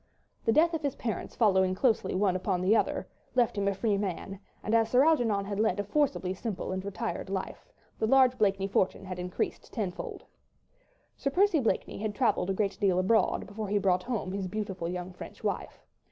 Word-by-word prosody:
The 225 - +4
death 330 +7 +4
of 320 - -1
his 285 -3 -1
parents 225 -3 -4
following 190 -5 +3
close 230 +2 +3
upon 190 - -3
one 190 -2 +2
another 185 +2 +1 0.3
left 240 -2 +3
him 200 -1 0
a 200 - +1
free 200 0 +1
man, 195 0 -4 0.2
and 215 - -2
as 225 -1 +4
Sir 255 +3 +5
Algernon 230 -11 +2
had 200 0 -3
led 215 -3 +2
a - - +1
forcibly 205 -5 0
simple 195 0 -4
and 185 0 -3
retired 200 0 -4
life, 190 -1 -4 0.3
the 220 - +1
large 260 0 +5
Blakeney 195 -2 +2
fortune 195 0 0
had 185 -1 -6
increased 180 0 -3
tenfold. 195 -6 -4 0.9
Sir 275 - -1
Percy 370 +2 +3
Blakeney 225 -7 -1
had 210 0 -3
travelled 230 -7 +1
a - - +2
great 200 -1 -1
deal 190 -3 +3
abroad, 195 +5 +2
before 210 +1 -5
he 205 +1 +1
brought 185 -2 +2
home 220 -4 -3
his 195 -1 -3
beautiful, 190 -3 -3
young, 180 +1 -5
French - - -11
wife. - - -3
200 Hz, 195 wpm, -29 LUFS, 190-230 Hz, 0.9 s, Sir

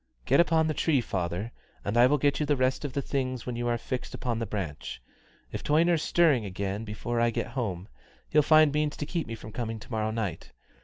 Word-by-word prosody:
"Get - - +4
up 170 -2 +4
on 160 -1 +4
the 155 - 0
tree, 150 -2 +2
father, 95 0 -3 0.3
and 100 - -1
I 120 +1 +7
will 145 +3 +3
give 145 0 +1
you 150 - +1
the 145 - +3
rest 130 +1 +1
of 145 -3 -4
the 140 - -1
things 130 -3 -2
when 125 - -3
you 120 0 -2
are 120 0 +1
fixed 125 +2 -5
on 120 -2 0
the 115 - -2
branch. 85 -11 -5 0.5
If - - -5
Toyner's 165 +2 +3
stirring 160 -11 +3
again 100 +2 -3
before 115 +2 -3
I 120 - +4
get 115 - -3
home, 100 -8 -3 0.4
he'll 150 - +5
find 155 0 +5
means 150 0 0
to 150 - -3
keep 165 +1 -3
me 115 - -4
from 110 - -10
coming 115 -1 -3
to 110 - -13
morrow 110 -1 0
night. 105 -7 -4
120 Hz, 230 wpm, -28 LUFS, 110-145 Hz, 0.5 s, I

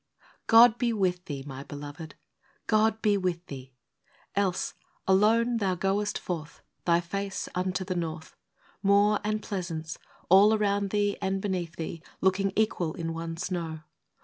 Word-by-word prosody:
OD 230 +1 +8
be 240 -2 +1
with 180 -4 0
thee, 140 -3 -5
my 135 -2 -7
beloved, 145 +2 -8 0.3
— - - -37 0.2
God 220 0 +2
be 205 -2 +4
with 180 -2 -2
thee! 130 -2 -10 0.6
Else, 195 -2 0 0.3
alone 225 +5 +4
thou 195 -4 0
goest 195 +3 0
forth, 165 -3 -6 0.2
Thy 170 -1 +4
face 195 +2 -4
unto 185 +1 -1
the 185 - -2
north, 160 -2 -5 0.3
— - - -32
Moor 200 +1 +4
and 215 0 -1
pleasance, 165 -5 -4 0.3
all 200 +4 +7
around 200 -1 +1
thee 205 0 +1
and 195 0 0
beneath 180 -4 -3
thee, 165 0 -5 0.2
Looking 190 +1 +2
equal 180 -7 +1
in 165 -1 -3
one 165 0 -5
snow 165 -3 -3
190 Hz, 150 wpm, -28 LUFS, 165-205 Hz, 0.6 s, OD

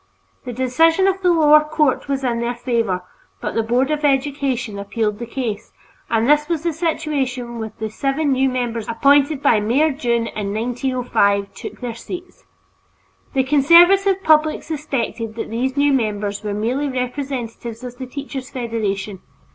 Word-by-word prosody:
The 250 - -4
decision 320 - +2
of 385 0 +1
the 360 -2 +3
lower 305 -2 +6
court 300 -3 0
was 275 -1 -2
in 240 -2 0
their 235 +1 -2
favor, 230 -7 -1 0.4
but - - -4
the 225 - +1
Board 245 +5 +1
of 305 0 -1
Education 270 -6 0
appealed 210 +1 -2
the 235 - -5
case, 230 -4 -4 0.4
and 225 0 +1
this 295 +2 +3
was 330 -2 -1
the 340 -1 0
situation 275 -7 -2
when 220 -1 -5
the 220 - -3
seven 275 +5 0
new 265 0 +2
members 240 -3 -3
appointed 280 +4 +3
by 220 - +4
Mayor 260 +9 +2
Dunne 235 -4 0
in 205 -2 -4
1905 235 -4 0
took - - -9
their 245 -2 -4
seats. 360 +9 -9 0.9
The 265 - +3
conservative 350 +8 +5
public 310 0 +3
suspected 265 -7 -3
that 225 - -5
these 260 +4 -2
new 285 0 +3
members 210 -4 -1
were 205 -1 -3
merely 250 +7 -1
representatives 250 -3 -4
of 245 -1 -8
the 260 - -5
Teachers' 270 0 -6
Federation. 210 -5 -3
255 Hz, 160 wpm, -20 LUFS, 230-295 Hz, 0.9 s, lower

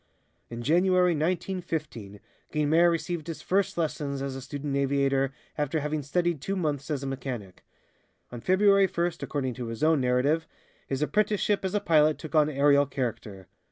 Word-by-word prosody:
In 120 0 -6
January, 180 +4 +3
1915, 160 - -3 0.3
Guynemer 155 +3 +3
received 170 -1 -2
his 165 - -6
first 195 0 0
lessons 150 -4 -2
as 135 -1 -4
a 135 - -6
student 140 +1 -4
aviator, 135 -1 +1 0.3
after 150 +2 0
having 150 +1 -2
studied 170 +2 -1
two 195 +6 -2
months 150 -5 -2
as 145 -3 -2
a - - -4
mechanic. 125 -8 -6 0.7
On 120 -1 -7
February 195 - +4
first, 170 -1 -2
according 130 -4 -2
to 120 -1 -6
his 115 +5 -5
own 155 -2 +4
narrative, 130 +6 +1 0.4
his 135 +2 -1
apprenticeship 205 +5 +1
as 190 +1 -2
a - - +3
pilot 155 -4 +3
took 155 - -9
on 155 -1 +4
aerial 140 0 +4
character. 115 -7 -4
150 Hz, 160 wpm, -27 LUFS, 135-170 Hz, 0.7 s, February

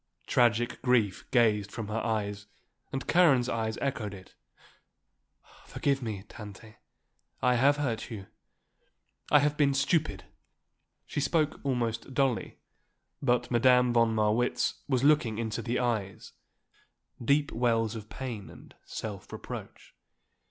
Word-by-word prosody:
Tragic 120 0 +2
grief 120 -6 +1
gazed 105 -5 +2
from 110 -3 -5
her 110 +2 -2
eyes 105 -3 -2 0.4
and 135 - -3
Karen's 145 -9 +4
eyes 110 -2 -2
echoed 110 -7 -2
it. 95 -1 -14 1.3
"Forgive 140 -1 0
me, 105 -5 -4
Tante, 110 +1 -11 0.6
I 125 - +3
have 140 +4 +4
hurt 125 -7 -2
you. 105 -5 -7 1.0
I 150 - +7
have 145 +1 +2
been 140 -2 +3
stupid," 155 +3 +1 0.8
she - - -3
spoke 150 +2 +1
almost 120 -2 -2
dully; 135 -4 0 0.6
but 125 0 +1
Madame 125 0 +4
von 115 -1 +3
Marwitz 110 +3 +1
was 130 -3 +1
looking 145 -7 +3
into 115 0 -2
the 120 +2 -1
eyes, 110 -6 -2 0.9
deep 145 +4 +2
wells 115 -1 +1
of 105 -1 -8
pain 120 -7 -6
and - - -14
self 100 -3 -7
reproach. - - -8
120 Hz, 125 wpm, -29 LUFS, 110-135 Hz, 1.3 s, I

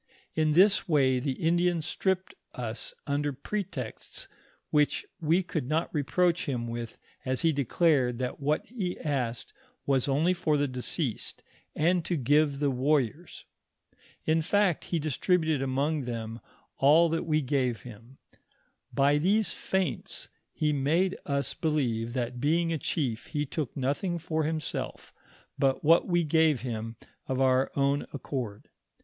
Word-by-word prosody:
idi 160 - +1
In 155 -1 +3
this 195 +4 +5
way 135 -5 +3
the 135 +1 -1
Indian 175 +3 +1
stripped 190 +3 -1 0.2
us - - -5
under 145 +1 0
pretexts, 205 - -5 0.4
which 150 -1 +2
we 170 +3 +2
could 160 -7 -3
not 160 +2 0
reproach 170 +4 +1
him 120 -3 -2
with, 115 -1 -5 0.3
as 130 0 -1
he 165 -1 +4
declared 140 -2 +2
that 125 0 -3
what 150 +2 0
he 200 -7 -4
asked 125 -6 -2 0.3
was 135 -2 +2
only 150 +6 +3
for 165 -4 +1
the 145 0 +1
deceased, 125 - -2 0.3
and 175 +2 +2
to 175 - -1
give 145 +2 +3
the 145 -1 +1
warriors.. 140 +4 0 0.8
In 160 +1 +3
fact, 195 0 +2
he 170 - -1
distributed 160 0 +1
among 135 +2 0
them 115 -1 -5 0.4
all 155 +5 +6
that 165 0 -2
we 155 -1 +2
gave 130 -3 0
him. 120 +2 -12 0.7
By 140 +1 +3
these 205 +6 +2
feints 190 -1 -2 0.2
he 150 -1 0
made 160 +7 +1
us 140 0 -1
believe 120 -7 -1
that 125 -1 -2
being 165 +3 +2
a 160 - -2
chief, 125 -5 -2
he 150 -2 -2
took 145 -3 -4
nothing 145 +7 -1
for 160 -1 -1
himself, 155 -1 -4 0.5
but 135 -1 +2
what 165 +3 +5
we 175 -2 +2
gave 160 -3 +3
him 115 -2 -4 0.3
of 130 0 -1
our 130 0 +3
own 140 +1 +1
accord. 125 -7 -5
145 Hz, 145 wpm, -28 LUFS, 130-165 Hz, 0.8 s, all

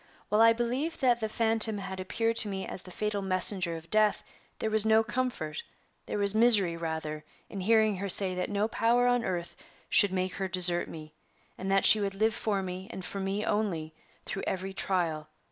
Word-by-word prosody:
"While 210 +1 +3
I 230 0 +7
believed 245 +8 -2
that 245 -3 +3
the 220 -1 -3
phantom 225 -1 +1
had 190 -1 -6
appeared 225 +5 -1
to 215 - +4
me 190 -1 -4
as - - -6
the 185 - -13
fatal 205 +2 -3
messenger 185 -2 -1
of 165 0 -13
death, 215 -1 +3 0.3
there 220 - -3
was 215 -1 +4
no 220 0 +4
comfort 225 -11 -3 0.5
there - - -3
was 200 -1 +2
misery, 215 -6 +4
rather, 160 -2 -5 0.3
in 200 - -7
hearing 215 0 +3
her 200 +1 -4
say 190 0 +3
that 180 0 -3
no 205 +1 0
power 235 +2 +2
on 245 -1 +2
earth 175 -4 -4 0.3
should 205 - +5
make 185 0 -2
her 195 - -3
desert 180 -1 +2
me, 155 -1 -10 0.4
and 190 - -5
that 195 0 +3
she 215 - +8
would 200 -1 -2
live 220 +2 +1
for 200 -3 -2
me, 185 +1 -6
and 190 -5 -7
for 195 - -6
me 195 +2 -2
only, 175 -7 -2 0.3
through 195 - -4
every 190 +1 -3
trial. 165 -6 -1
195 Hz, 200 wpm, -29 LUFS, 185-220 Hz, 0.5 s, she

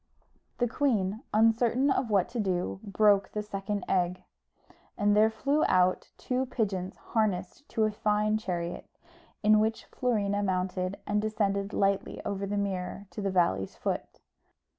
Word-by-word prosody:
The 245 - +2
queen, 225 -5 0
uncertain 230 +5 +3
what 210 -9 +2
to 240 - -4
do, 180 - -1
broke 200 0 +3
the 210 - -2
second 200 -1 -4
egg, 180 -1 0 0.7
and 205 -1 +3
there 215 +1 +5
flew 280 +7 0
out 185 0 +2
two 255 +1 -1
pigeons 195 -7 -2 0.2
harnessed 215 +4 -1
to 220 - 0
a 215 - +2
fine 210 0 +1
chariot, 175 -4 -4 0.6
in 215 0 +6
which 220 +1 0
Florina 205 -5 0
mounted, 185 0 -1
and 210 0 +1
descended 205 -2 -1
lightly 195 -1 0
over 200 0 -2
the 205 +1 -2
mirror 195 0 -3
to 210 - -6
the 200 - 0
valley's 95 - +1
foot. - - -4
205 Hz, 140 wpm, -29 LUFS, 190-220 Hz, 0.7 s, in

